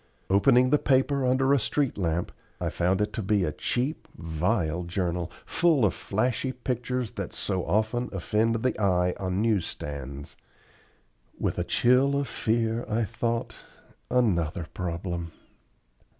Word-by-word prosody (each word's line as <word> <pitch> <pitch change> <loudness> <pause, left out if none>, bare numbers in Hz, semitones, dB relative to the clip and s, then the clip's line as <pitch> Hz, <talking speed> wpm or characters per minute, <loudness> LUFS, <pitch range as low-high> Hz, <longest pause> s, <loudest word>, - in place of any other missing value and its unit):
Opening 125 +6 +5
the 150 - +5
paper 135 +1 +2
under 130 +2 +3
a 140 - +4
street 130 +4 0
lamp, 85 -2 -1 0.3
I - - -1
found 90 +3 +1
it 105 - -1
to 115 - -2
be 100 -1 +2
a 75 - 0
cheap, 125 - -2
vile 85 +1 -1
journal, 90 -1 -2
full 160 -9 +3
of 100 - +2
flashy 125 +5 -1
pictures 125 -2 -2
that - - -5
so 95 -3 -1
often 110 +4 0
offend 110 +4 0
the 125 -4 0
eye 90 -2 +2
on 95 +2 -1
news 110 -6 +2
stands. 70 -1 -6 1.0
With - - -1
a - - +1
chill 125 +9 +3
of 140 - -2
fear 115 +1 0
I 115 +2 +1
thought, 115 +1 -2 0.5
"Another 90 -8 +1
problem." 85 -1 -4
110 Hz, 140 wpm, -27 LUFS, 90-125 Hz, 1.0 s, Opening